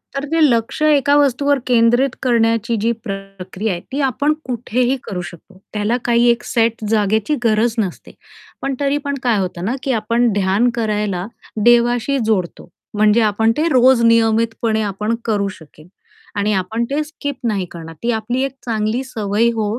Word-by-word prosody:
तर 275 - -2
ते 330 - +2
लक्ष्य 235 +6 0
एका 285 +1 +3
वस्तूवर 285 0 +2
केंद्रित 240 +2 +3
करण्याची 230 -1 +1
जी 230 - +2
प्रक्रिया 195 0 -5
आहे, 175 - -5
ती 275 - -2
आपण 285 +3 +1
कुठेही 250 +1 -1
करू 180 -3 -5
शकतो. 175 +2 -12 0.2
त्याला 215 +3 0
काही 240 0 +3
एक 235 0 +1
सेट 230 -1 0
जागेची 220 +5 +1
गरज 225 0 +2
नसते. 195 -6 -3 0.5
पण 275 0 -2
तरी 285 0 +1
पण 280 0 -1
काय 240 -4 +2
होतं 180 -2 -3
ना, 235 +6 -1
की 270 - -1
आपण 235 +3 +1
ध्यान 200 +4 +2
करायला 210 -5 -1 0.4
देवाशी 240 +3 +3
जोडतो, 185 -5 -2 0.2
म्हणजे 215 +2 +3
आपण 220 +1 +2
ते 315 +2 +1
रोज 255 -2 +4
नियमितपणे 225 -1 +2
आपण 210 +2 -2
करू 205 -3 0
शकेल. 160 -4 -12 0.5
आणि 205 +1 0
आपण 200 +5 -1
ते 290 +2 0
स्किप 285 -2 -6
नाही 200 -4 -1
करणार, 165 -1 -9
ती 240 - +1
आपली 235 +3 -2
एक 275 - -2
चांगली 220 +1 -1
सवय 220 -3 0
हो, 220 -2 -1
230 Hz, 165 wpm, -18 LUFS, 210-245 Hz, 0.5 s, रोज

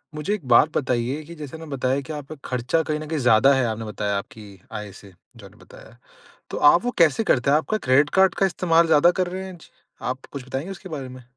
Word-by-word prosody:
मुझे 150 +7 -2
एक 200 -9 -5
बात 125 +5 +5
बताइए 130 +2 -1
कि 170 +3 -11
जैसे 150 -1 -8
ना 160 - -10
बताया 135 -2 -1
कि 145 +3 -8
आपका 150 +1 -8
खर्चा 125 +6 0
कहीं 155 -1 -2
न 155 - -7
कहीं 160 0 -2
ज़्यादा 125 +2 +5
है 135 -2 +1
आपने 110 -1 -3
बताया 105 -1 -2
आपकी 100 -1 -10
आय 105 -1 -6
से 100 -2 -16 0.2
जो - - -13
आपने - - -16
बताया। - - -16 0.5
तो - - -4
आप 150 +5 +5
वो 245 - 0
कैसे 165 +6 +3
करते 135 - +2
हैं? 145 - +5
आपका 215 +8 -1
क्रेडिट 140 -1 +3
कार्ड 190 0 +4
का 195 - +2
इस्तेमाल 170 -2 +2
ज़्यादा 160 +1 +5
कर 185 - +1
रहे 185 +2 -5
हैं? 190 -1 -9
जी - - -18 0.3
आप 130 +1 -4
कुछ 140 -3 -7
बताएँगे 135 +7 -5
उसके 190 0 -11
बारे 140 -6 -6
में? 130 0 -11
145 Hz, 245 wpm, -23 LUFS, 125-165 Hz, 0.5 s, बात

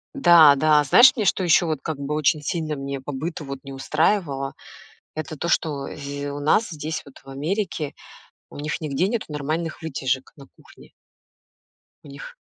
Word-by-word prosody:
Да, 170 - +7
да, 150 +1 +4
знаешь, 245 - +7
мне 215 -4 -1
что 190 - +2
еще 175 0 +4
вот 155 -4 -2
как 155 -3 -4
бы 140 +1 -4
очень 155 0 +1
сильно 155 -2 -2
мне 135 -1 -5
по 145 - -6
быту 150 +2 -5
вот 135 0 -7
не 135 0 -9
устраивало? 145 0 0 0.6
Это 155 0 -5
то, 170 - -4
что, 145 -5 0
зь 140 0 -6
у 145 0 -6
нас 185 +9 +2
здесь 155 0 -5
вот 140 - -14
в - - -19
Америке 160 +1 -3 0.6
у - - -12
них 150 +2 -4
нигде 155 +5 0
нету 225 0 -2
нормальных 155 +3 -4
вытяжек 135 -3 -2
на 140 - -13
кухне. - - -18 1.1
У - - -12
них - - -10
150 Hz, 180 wpm, -23 LUFS, 140-165 Hz, 1.1 s, Да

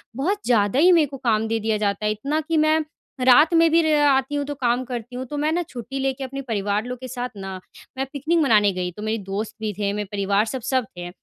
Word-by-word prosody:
बहुत 375 +10 -1
ज़्यादा 225 +1 +2
ही 360 +3 +6
मेरे 330 -4 +5
को 275 0 -8
काम 225 -3 +1
दे 225 0 -1
दिया 220 0 0
जाता 205 0 -1
है, 210 - +2
इतना 280 +9 -2
कि 320 +1 -1
मैं 310 +1 +3 0.5
रात 300 +6 +6
में 330 0 +5
भी 335 0 +5
रे 315 -1 +2
आती 270 +1 +2
हूँ 285 - 0
तो 290 - -4
काम 245 -1 0
करती 245 0 -6
हूँ। 260 +1 -4
तो 295 - -5
मैं 305 +2 +1
ना 350 +2 +1
छुट्टी 255 +2 -6
लेके 270 0 -2
अपने 275 +1 -5
परिवार 210 -3 -1
लोग 250 0 -6
के 255 - -7
साथ 250 0 -4
ना 195 -1 -6 0.4
मैं 270 - -1
पिकनिक 315 +5 0
मनाने 215 -8 +4
गई, 180 -1 -3
तो 210 - -11
मेरे 220 +1 -1
दोस्त 200 +3 -4
भी 215 -1 -1
थे, 200 +1 -2
मेरे 210 0 -3
परिवार, 200 +1 +1
सब 255 +2 -4
सब 260 -1 0
थे। 175 0 -6
250 Hz, 255 wpm, -23 LUFS, 210-285 Hz, 0.5 s, ही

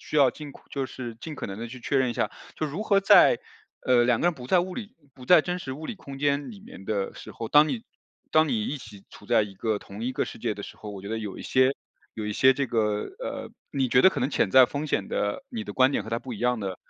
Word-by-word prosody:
需 - - -4
要 140 -3 +6
尽 150 -2 -9
快 - - -16
就 135 -2 -2
是 120 -3 -7
尽 155 -3 -7
可 - - -4
能 95 0 -6
地 115 - -5
去 125 - -9
确 135 +3 0
认 130 -2 +2
一 - - -2
下。 - - -1 0.2
就 155 - -1
如 155 +9 -4
何 200 -2 +3
在 200 - +6 0.5
呃， 125 -2 +5
两 120 -1 +3
个 - - +2
人 175 - +2
不 125 -2 -10
在 185 - +5
物 180 +1 -1
理 230 +1 -8 0.2
不 130 -2 -12
在 175 +4 +7
真 180 +4 -3
实 130 - -5
物 155 +4 -7
理 235 - -4
空 140 -8 -10
间 145 0 0
里 210 - -11
面 195 - -12
的 100 -3 -2
时 - - -10
候， 115 - -5
当 150 +1 +6
你 230 - -3 0.5
当 155 0 +4
你 110 -5 0
一 150 - -2
起 105 -5 -13
处 105 - -14
在 115 -1 +4
一 100 - -10
个 110 +2 -1
同 100 +2 -10
一 125 - -1
个 - - -1
世 - - -9
界 115 -3 -1
的 100 - -8
时 - - -10
候， 105 - -9
我 100 -1 -8
觉 100 - -7
得 115 - -1
有 105 -3 -6
一 - - -7
些 130 +1 +3 0.4
有 110 - -5
一 105 - -2
些 130 +5 +5
这 140 +1 -1
个 105 -3 0 0.2
呃， - - -5 0.2
你 135 -2 +1
觉 125 - +5
得 190 - +9
可 - - -4
能 130 - +1
潜 95 - +1
在 130 +3 +8
风 145 +4 -4
险 100 - 0
的 100 - -2
你 230 -3 -4
的 - - -6
观 130 +1 +4
点 - - 0
和 - - -10
他 115 - 0
不 125 0 -8
一 - - -9
样 125 -1 +1
的， 95 -2 -4
130 Hz, 320 characters per minute, -26 LUFS, 110-150 Hz, 0.5 s, 得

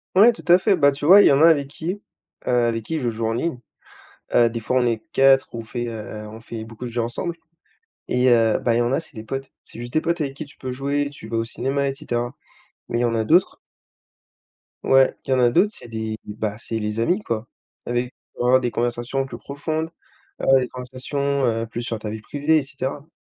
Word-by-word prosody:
Ouais, 215 +6 +8
tout 230 - -11
à 175 +1 +8
fait. 195 +2 +3
Bah, 145 -5 +4
tu 140 +1 -4
vois, 195 +6 +9
il - - +6
y - - +6
en 140 +1 +4
a 165 - +8
avec 145 -4 +4
qui, 175 +8 -5 0.5
heu, - - 0 0.2
avec 115 -1 -1
qui 160 - -2
je 125 -4 0
joue 115 0 -2
en 115 - 0
ligne. 140 +2 -2 0.7
Heu, 120 -1 +5
des 115 0 -4
fois 125 +3 0
on 125 - +3
est 115 -2 0
4, 135 0 +5
on 115 - -4
fait, 120 +1 -4
heu, 110 -1 -7
on 110 +1 -10
fait 115 -1 -7
beaucoup 115 +2 -9
de - - -4
jeux 120 0 -1
ensemble 120 +9 -3 0.7
et 125 +1 +2
heu, 115 -2 +4
bah, 115 - +1
il - - +2
y - - +3
en 120 +1 +1
a, 135 - +1
c'est 160 -2 -8
des 110 - -7
potes, 135 +3 -5
c'est - - -11
juste 120 0 -7
des 155 - +2
potes 170 +1 -1
avec 140 -3 -2
qui 150 - -6
tu 140 - -9
peux 130 - -5
jouer, 140 +2 -1
tu 140 -6 -8
vas 115 - -2
au 115 - +1
cinéma 135 +4 -1
et 135 - -3
cetera. 120 -1 -3 0.5
Mais 120 - -1
il - - +2
y - - +2
en 115 -1 +1
a 110 -1 +1
d'autres 175 +10 +3 1.3
Ouais. 135 0 +4
Il - - -3
y - - +5
en 130 - +2
a 120 -1 +5
d'autres, 185 - +3
c'est 120 - -7
des, 110 -1 -4
bah, 105 0 -4
c'est 115 0 -3
les 105 +1 -3
amis 180 - +1
quoi. 115 - -3 0.4
Avec 120 +1 -1 0.2
peut - - -3
avoir 125 +1 +5
des 125 -1 -1
conversations 120 +3 -1
plus 135 - -8
profondes, 155 +3 -3 0.5
avoir 135 - +4
des 125 - -1
conversations, 130 +3 -2
heu, 115 -1 0
plus 115 +1 -5
sur 115 -1 -2
ta 110 0 -6
vie 110 0 -6
privée 145 +6 +1
et - - -2
cetera. 135 +1 -5
125 Hz, 250 wpm, -22 LUFS, 115-140 Hz, 1.3 s, vois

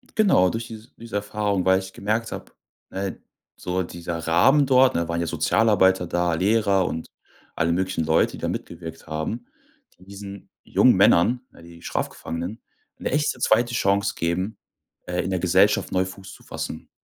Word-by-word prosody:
Genau, 190 - +4
durch 115 +3 -4
diese 110 0 -11
diese 115 -2 -9
Erfahrung, 100 -2 -1
weil 95 0 +4
ich 95 0 -9
gemerkt 110 +3 -2
hab - - -8 0.3
ne, 95 0 -5 0.3
so 90 +1 -2
dieser 85 -1 -6
Rahmen 90 - +4
dort 130 0 +4
ne, 85 0 0
waren 85 0 -2
ja 85 - -1
Sozialarbeiter 95 +3 +3
da, 85 0 0
Lehrer 100 +1 +2
und 80 - -4 0.5
alle 85 +1 +1
möglichen 95 -1 -1
Leute, 80 +1 +2
die - - -7
da - - -3
mitgewirkt 80 -1 -7
haben, 80 +10 -4 0.5
die 90 - -19
diesen 100 0 -10
jungen - - +4
Männern, 120 +9 +4 0.2
die 85 0 -14
Strafgefangenen, 85 +8 -4 0.4
'ne - - -3
echte, 145 -2 0
2. 120 +1 +2
Chance 100 -3 +1
geben, 90 +5 -2 0.5
äh, 90 0 -1
in - - -3
der 95 - 0
Gesellschaft - - +3
neu 95 0 +1
Fuß 95 +1 -10
zu - - -16
fassen. - - -6
95 Hz, 165 wpm, -24 LUFS, 85-110 Hz, 0.5 s, Genau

